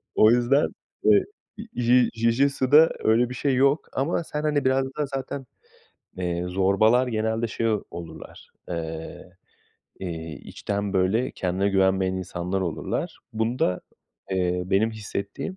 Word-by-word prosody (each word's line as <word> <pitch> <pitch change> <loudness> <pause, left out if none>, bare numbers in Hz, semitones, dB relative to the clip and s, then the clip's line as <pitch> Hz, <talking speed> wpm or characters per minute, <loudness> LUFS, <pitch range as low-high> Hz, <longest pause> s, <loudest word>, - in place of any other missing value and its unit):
O 110 +1 +6
yüzden, 125 +4 +3 0.4
eee, - - +5 0.5
Ji 125 0 +4
Jijitsu'da 135 +6 +4
öyle 120 +2 +3
bir - - -5
şey 135 -1 0
yok 140 +4 +2
ama 155 +5 0
sen, 150 -1 -4
hani, 150 -3 +1
biraz 130 0 +3
daha 150 - 0
zaten, 135 0 -5 0.7
eee, 90 -1 -2
zorbalar 100 +7 +3
genelde 110 0 -1
şey 115 +1 -1
ol 105 -2 0
olurlar, 85 -1 -10 0.2
eee, 80 -1 -6 0.7
iii, 80 -4 -5
içten, 100 -1 -4
böyle, 95 +7 +2
kendine 95 +2 -1
güvenmeyen 95 -1 +2
insanlar 90 +1 -3
olurlar. 85 -4 -3 0.2
Bunda, 110 -4 0 0.5
eee, 90 -1 0
benim 100 +4 +2
hissettiğim, 105 - -5
110 Hz, 125 wpm, -25 LUFS, 95-130 Hz, 0.7 s, O